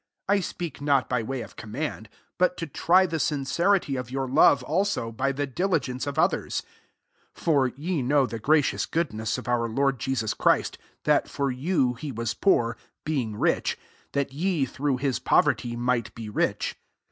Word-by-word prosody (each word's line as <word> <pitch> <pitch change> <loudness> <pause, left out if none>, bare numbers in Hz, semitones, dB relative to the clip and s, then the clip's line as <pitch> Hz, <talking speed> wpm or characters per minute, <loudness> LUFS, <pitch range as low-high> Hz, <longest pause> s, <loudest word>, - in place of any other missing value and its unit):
8 200 - +3
I 205 - +3
speak 170 -5 -5
not 140 -2 +2
by 125 -2 0
way 130 +3 -4
of - - -10
command; 110 -1 -5 0.3
but 180 0 +2
to 165 - -3
try 180 +5 +3
the 165 -3 -2
sincerity 155 +3 +1
of 125 -2 -5
your 135 +1 -2
love 140 +1 +5
also, 170 - 0
by 135 +4 0
the 145 +1 -2
diligence 140 -4 -1
of 140 +1 -4
others. - - +1 0.7
9 - - -14
(For 140 -5 +4
ye 150 +5 -3
know 140 +2 +3
the 115 -3 -5
gracious 150 +4 +2
goodness 110 -10 -1
of - - -8
our 120 -1 +1
Lord 135 +2 +1
Jesus 115 -4 -1
Christ, - - +1 0.2
that - - +2
for 140 -1 -1
you 130 -1 +1
he 140 +4 -6
was 115 -1 -2
poor, 120 - +2 0.3
being 130 -9 -1
rich,* - - +1 0.4
that 140 -1 -1
ye, 165 -1 0
through 135 +1 -1
his 135 -1 -1
poverty, 120 -1 +2
might 120 -1 -1
be 115 -2 -6
rich.) 105 - -1
135 Hz, 175 wpm, -26 LUFS, 120-155 Hz, 0.7 s, love